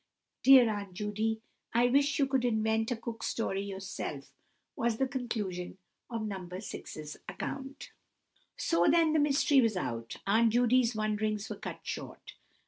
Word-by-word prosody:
Dear 265 -3 +8
Aunt 200 -4 -4
Judy, 215 +2 -1 0.3
I 240 +1 +5
wish 280 +3 +3
you 280 - +3
would 265 -2 0
invent 220 -1 +1
a 245 - 0
Cook 225 0 -7
Story 195 -4 -1
yourself!" 190 -8 -6 0.4
was 230 -1 0
the 265 - +1
conclusion 215 -9 -4 0.3
of 230 -2 -3
No. 200 -2 -3
6's 180 -4 -7
account. 270 +9 -6 0.7
So 170 +1 +2
then 330 -2 +4
the 310 - +4
mystery 285 -1 +4
was 225 -5 +1
out. 115 -8 -4
Aunt 225 +2 +3
Judy's 245 0 +3
wonderings 215 0 -1
were - - -3
cut - - -7
short. - - -7
220 Hz, 145 wpm, -31 LUFS, 200-245 Hz, 0.7 s, Dear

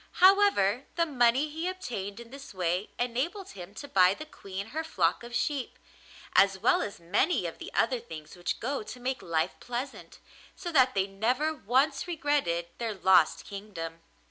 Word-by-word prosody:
However, 370 - +5
the 335 0 +3
money 260 -1 +3
he 320 +3 -4
obtained 230 - -5
in 235 0 -11
this 275 -6 -10
way 180 +2 -1
enabled 265 - -2
him 190 +1 -10
to 285 - -7
buy 185 -4 +5
the 310 - -8
Queen 200 -7 -7
her 315 +3 -3
flock 180 - +1
of 240 0 -7
sheep, 275 0 -1 0.6
as 195 -1 +5
well 220 +6 +3
as 200 - -5
many 200 - +1
of - - -5
the - - -8
other 255 -3 +2
things 160 -10 -10
which 175 -1 -3
go 270 +4 -2
to 230 +4 -9
make 260 +1 -2
life 165 +1 0
pleasant, 250 +3 -6 0.4
so 345 - -5
that 260 -6 +4
they 190 -1 +2
never 245 +10 0
once 275 - +1
regretted 290 - 0
their 225 -3 -2
lost 185 -4 +4
kingdom. 190 -5 -7
235 Hz, 170 wpm, -29 LUFS, 190-285 Hz, 0.6 s, However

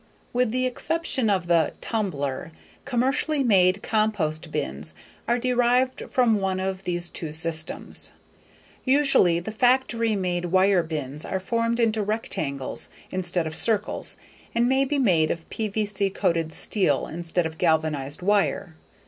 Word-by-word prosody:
With 250 -1 +2
the 255 +3 0
exception 260 -1 0
of 190 -3 +1
the 170 -3 +2
"tumbler," 155 - -3 0.3
commercially 275 +3 +1
made 190 -4 +3
compost 180 -8 0
bins 70 - -3 0.3
are 240 - +2
derived 250 +1 +1
from 230 -4 +3
one 190 -1 -1
of 190 0 -3
these 175 -1 -2
two 160 -2 -5
systems. 160 +1 -1 0.7
Usually 260 -11 +4
the 180 +5 -6
factory 235 -1 +2
made 180 -2 -1
wire 185 +1 +4
bins 150 -2 -4
are 190 - -2
formed 230 +4 -1
into 220 -2 +2
rectangles 160 - -3 0.2
instead 180 -2 -1
of 160 0 -4
circles 210 +3 +1 0.4
and 235 +1 +3
may 265 +1 +3
be 290 +2 -1
made 175 - +3
of 165 -1 -4
PVC 205 -2 -1
coated 165 -3 0
steel 195 +4 +1
instead 170 +1 -2
of 160 0 -6
galvanized 155 -3 0
wire. 195 -4 +1
190 Hz, 135 wpm, -25 LUFS, 165-235 Hz, 0.7 s, Usually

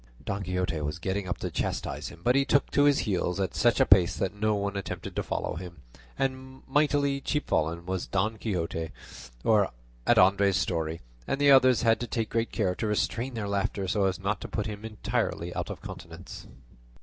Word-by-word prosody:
Don 100 +1 -2
Quixote 90 -4 -1
was 75 +3 -3
getting 95 +2 -2
up 90 - -2
to - - -4
chastise - - -3
him, - - -11
but 125 - +4
he 140 - +4
took 140 +1 +2
to 145 - +4
his 145 -1 +5
heels 95 -3 -1
at 95 - -1
such 120 0 +3
a - - +6
pace 95 -3 +5
that 95 - -1
no 105 +1 +1
one 100 0 -2
attempted 100 - -5
to - - 0
follow - - -3
him; 85 -5 -9 0.3
and 130 0 -3
mightily 140 -1 +2
chapfallen 85 - -1
was 95 0 -3
Don 105 +3 0
Quixote 85 -5 -2 0.6
at - - +1
Andres' 100 0 +5
story, 80 -4 -1 0.3
and 135 - -1
the 145 0 +6
others 130 -3 +6
had 115 -1 +4
to 120 - -3
take 115 -2 -2
great 115 +1 0
care 95 -5 0
to 110 - -3
restrain 115 +4 -1
their 105 -3 -3
laughter 100 -1 -1
so 100 +1 +1
as 95 -1 0
not 100 +1 -2
to - - -5
put 105 - -3
him 105 -1 -6
entirely 105 -5 -2
out - - -3
of - - -7
countenance. - - -9
100 Hz, 195 wpm, -28 LUFS, 90-115 Hz, 0.6 s, a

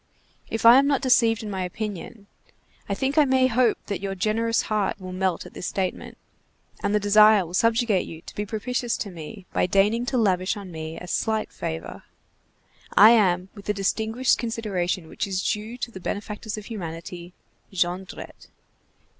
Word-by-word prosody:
If 225 0 -3
I 235 +3 +10
am 280 - +2
not 280 -2 +1
deseaved 230 -3 +3
in 210 - -5
my 190 -1 -3
opinion, 205 +2 -6 0.6
I 200 - 0
think 270 +7 +1
I - - +7
may 260 -1 +3
hope 245 -2 +2
that 200 - -4
your 195 -1 -3
generous 225 +4 +1
heart 210 -2 -1
will 185 -1 -7
melt 185 -2 -1
at - - -12
this - - -5
statement 190 -2 -3 0.6
and 200 +1 0
the - - +4
desire 210 -1 +6
will 170 - -11
subjugate 225 -1 +2
you 160 -1 -9
to - - -11
be 205 - -3
propitious 235 +3 -2
to 200 - -5
me 180 +4 -9
by - - +2
daigning 210 +6 +2
to 255 - 0
lavish 190 -3 +1
on 195 -3 -8
me 160 0 -6
a 180 - -8
slight 220 +4 -1
favor. 80 +1 -6 1.0
I 215 +3 +10
am 185 -5 +3
with 200 -2 -12
the 210 - -1
distinguished 220 +5 +1
consideration 195 -7 -2
which 200 - -4
is 190 -1 -2
due 215 +3 -3
to 245 -1 -5
the 190 - -9
benefactors 210 +3 -5
of 210 - -8
humanity,— 175 -3 -7 0.4
JONDRETTE. 185 0 -4
205 Hz, 180 wpm, -24 LUFS, 185-230 Hz, 1.0 s, I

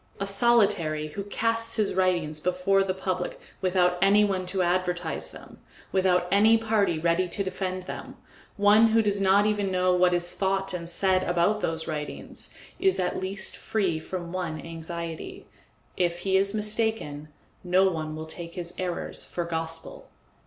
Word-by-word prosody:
A 195 - -1
solitary 195 -8 +2
who 200 - -5
casts 230 +2 0
his 215 -3 +1
writings 175 -5 +1
before 180 +4 +2
the 195 - -1
public 185 -1 -3 0.2
without 180 -1 +2
any 200 +2 +5
one 190 -3 -1
to 185 0 0
advertise 180 0 -1
them, - - -13 0.3
without 185 -2 +2
any 215 +3 +6
party 215 -6 +1
ready 170 +3 +1
to 200 - -2
defend 185 -1 -3
them, - - -8 0.4
one 210 +2 +6
who 225 0 +3
does 205 -1 0
not 195 +1 +4
even 205 -2 +1
know 185 0 +2
what 180 0 +4
is 175 0 0
thought 195 0 -1
and 170 -2 -5
said 185 +1 +2
about 175 +5 +1
those 160 0 -2
writings, 150 -1 -6 0.3
is 385 -1 +2
at 180 0 -1
least 190 +1 -3
free 190 -7 -1
from 175 +1 -6
one 170 -4 -3
anxiety 165 0 -6 0.5
if 175 -1 0
he 190 0 +1
is 200 +2 +2
mistaken, 210 -9 -1 0.4
no 185 +2 +4
one 155 -4 -3
will 155 0 -6
take 170 +1 -7
his 175 -1 -3
errors 180 -2 -2
for 175 - -4
gospel. 165 -1 -5
185 Hz, 160 wpm, -26 LUFS, 170-200 Hz, 0.5 s, any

